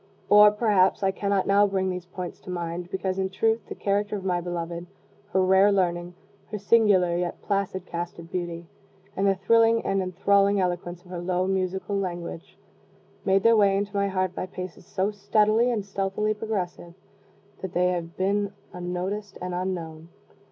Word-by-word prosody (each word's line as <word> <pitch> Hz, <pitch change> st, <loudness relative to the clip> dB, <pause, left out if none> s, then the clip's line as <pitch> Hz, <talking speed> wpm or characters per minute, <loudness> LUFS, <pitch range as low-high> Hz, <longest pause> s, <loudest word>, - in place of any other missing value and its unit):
Or, 210 Hz, 0 st, +9 dB
perhaps, 205 Hz, -3 st, +2 dB
I 190 Hz, -, +3 dB
cannot 200 Hz, 0 st, 0 dB
now 200 Hz, +1 st, +4 dB
bring 190 Hz, -1 st, 0 dB
these 180 Hz, -1 st, -6 dB
points 180 Hz, -1 st, -7 dB
to -, -, -13 dB
mind, 175 Hz, 0 st, -4 dB
because, 190 Hz, 0 st, -2 dB
in 190 Hz, 0 st, 0 dB
truth, 225 Hz, +4 st, +1 dB
the -, -, -5 dB
character 205 Hz, +1 st, -1 dB
of 195 Hz, -2 st, -6 dB
my 180 Hz, -2 st, 0 dB
beloved, 170 Hz, 0 st, -5 dB, 0.4 s
her 190 Hz, -, +3 dB
rare 190 Hz, +2 st, +5 dB
learning, 175 Hz, -2 st, 0 dB, 0.3 s
her 210 Hz, -, -4 dB
singular 200 Hz, -4 st, +3 dB
yet 175 Hz, 0 st, -2 dB
placid 195 Hz, -2 st, -1 dB
cast 175 Hz, 0 st, -5 dB
of 165 Hz, 0 st, -11 dB
beauty, 175 Hz, -1 st, -4 dB, 0.5 s
and 195 Hz, +1 st, +1 dB
the 195 Hz, -, +3 dB
thrilling 230 Hz, +4 st, +3 dB
and 195 Hz, 0 st, +1 dB
enthralling 200 Hz, +2 st, +2 dB
eloquence 175 Hz, -1 st, -2 dB
of 180 Hz, -, -14 dB
her 175 Hz, -1 st, -4 dB
low 180 Hz, +1 st, 0 dB
musical 190 Hz, +1 st, -1 dB
language, 175 Hz, -3 st, -5 dB, 0.7 s
made 195 Hz, 0 st, +3 dB
their 230 Hz, 0 st, +6 dB
way 200 Hz, -2 st, +4 dB
into 200 Hz, +1 st, -3 dB
my 200 Hz, 0 st, +2 dB
heart 185 Hz, -2 st, -1 dB
by 185 Hz, -, -4 dB
paces 180 Hz, -1 st, -8 dB
so 190 Hz, +2 st, -1 dB
steadily 215 Hz, +3 st, +2 dB
and 220 Hz, -5 st, -1 dB
stealthily 200 Hz, +2 st, -1 dB
progressive, 185 Hz, -5 st, -4 dB, 0.7 s
that 190 Hz, -2 st, -5 dB
they 180 Hz, +1 st, +2 dB
have 170 Hz, -2 st, -4 dB
been 200 Hz, +1 st, 0 dB, 0.2 s
unnoticed 180 Hz, +3 st, -4 dB
and 180 Hz, 0 st, -4 dB
unknown. 170 Hz, -3 st, -4 dB
190 Hz, 175 wpm, -26 LUFS, 180-200 Hz, 0.7 s, Or